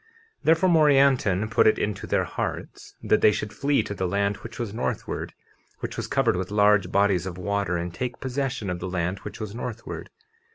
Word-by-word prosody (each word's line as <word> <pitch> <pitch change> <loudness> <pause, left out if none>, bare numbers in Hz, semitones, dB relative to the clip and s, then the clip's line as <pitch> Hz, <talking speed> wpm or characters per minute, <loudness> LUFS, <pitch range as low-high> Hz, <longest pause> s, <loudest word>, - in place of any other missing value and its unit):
50:29 450 - -33 0.4
Therefore, 165 +3 +4
Morianton 135 - +4
put - - +4
it 110 - +4
into 105 -1 -3
their - - +1
hearts - - -5
that 110 - +3
they 105 - +6
should 105 0 -4
flee 140 +6 +1
to - - -5
the 95 -2 -2
land 100 +2 0
which 115 - -10
was 115 -4 -4
northward, 120 - -3 0.5
which - - -4
was - - -4
covered - - +2
with 95 0 -3
large 105 0 +3
bodies 100 -3 +2
of 90 -2 -6
water, 100 -1 -1
and 85 0 -4
take 120 +5 -4
possession 130 -6 -2
of 90 - -4
the 90 +1 -4
land 90 +1 -2
which 105 0 -9
was 105 -2 -5
northward. 115 -1 -6
105 Hz, 200 wpm, -25 LUFS, 95-125 Hz, 0.5 s, they